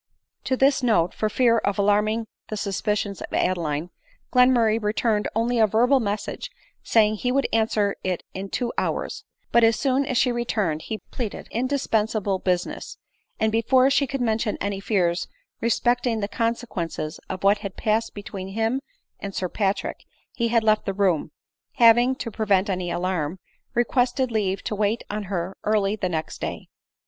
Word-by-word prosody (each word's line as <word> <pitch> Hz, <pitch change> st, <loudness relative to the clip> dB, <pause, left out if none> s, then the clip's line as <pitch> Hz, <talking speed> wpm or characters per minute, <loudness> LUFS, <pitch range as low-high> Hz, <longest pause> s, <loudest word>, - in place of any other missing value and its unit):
To 260 Hz, -, +1 dB
this 270 Hz, +1 st, +3 dB
note, 200 Hz, -9 st, +2 dB
for 215 Hz, -, -1 dB
fear 230 Hz, +1 st, +3 dB
of 200 Hz, -2 st, -1 dB
alarming 210 Hz, +2 st, +2 dB, 0.2 s
the 215 Hz, -, -4 dB
suspicions 200 Hz, 0 st, -2 dB
of -, -, -7 dB
Ad 185 Hz, -, +2 dB
eline, 155 Hz, +1 st, -3 dB, 0.4 s
Glenmurray 240 Hz, -3 st, +4 dB
returned 210 Hz, 0 st, +1 dB
only 235 Hz, +2 st, +1 dB
a 220 Hz, -, +6 dB
verbal 245 Hz, +6 st, +4 dB
message, 210 Hz, -, -3 dB, 0.3 s
saying 215 Hz, -1 st, +3 dB
he 250 Hz, +4 st, -1 dB
would 275 Hz, +1 st, +2 dB
*kiswer 215 Hz, -2 st, +2 dB
it 185 Hz, -1 st, -2 dB
in 195 Hz, +1 st, -5 dB
two 240 Hz, +2 st, -2 dB
hours; -, -, -3 dB, 0.3 s
but 235 Hz, -, +5 dB
as 225 Hz, 0 st, +5 dB
soon 270 Hz, +2 st, +1 dB
as 255 Hz, -, 0 dB
she 250 Hz, -, +3 dB
re 240 Hz, 0 st, -1 dB
turned 175 Hz, -10 st, -1 dB
he 220 Hz, -, -4 dB
pleaded 230 Hz, -5 st, -5 dB
indispensable 220 Hz, -6 st, 0 dB
business; 180 Hz, -1 st, -2 dB, 0.4 s
and 220 Hz, 0 st, +2 dB
before 255 Hz, +4 st, +4 dB
she 275 Hz, 0 st, +3 dB
could 275 Hz, 0 st, -3 dB
mention 220 Hz, -2 st, 0 dB
any 200 Hz, -1 st, -2 dB
fears 180 Hz, -4 st, 0 dB, 0.3 s
respecting 240 Hz, 0 st, +1 dB
the 200 Hz, -, -1 dB
consequences 210 Hz, -9 st, -3 dB
of 190 Hz, 0 st, -5 dB
what 200 Hz, +1 st, +4 dB
had 200 Hz, -2 st, -7 dB
pased 225 Hz, 0 st, 0 dB
between 200 Hz, -2 st, -6 dB
him 225 Hz, +6 st, -1 dB, 0.4 s
and 200 Hz, -1 st, -6 dB
Sir 185 Hz, -, -1 dB
Patrick, 200 Hz, 0 st, -2 dB, 0.3 s
he 235 Hz, -, 0 dB
had 230 Hz, -1 st, +2 dB
left 215 Hz, -1 st, +2 dB
the 195 Hz, -, 0 dB
room, 185 Hz, -7 st, +1 dB, 0.4 s
having, 240 Hz, +2 st, +5 dB
to 235 Hz, -3 st, -5 dB
prevent 200 Hz, -2 st, +1 dB
any 180 Hz, -1 st, -2 dB
alarm, 175 Hz, -2 st, -1 dB, 0.4 s
requested 245 Hz, +1 st, +1 dB
leave 200 Hz, -3 st, -1 dB
to -, -, -3 dB
wait 210 Hz, +2 st, 0 dB
on 210 Hz, 0 st, -3 dB
her 185 Hz, -1 st, -3 dB
early 210 Hz, -1 st, +2 dB
the 190 Hz, -4 st, -2 dB
next 160 Hz, -2 st, -4 dB
day. -, -, -5 dB
215 Hz, 170 wpm, -24 LUFS, 195-235 Hz, 0.4 s, a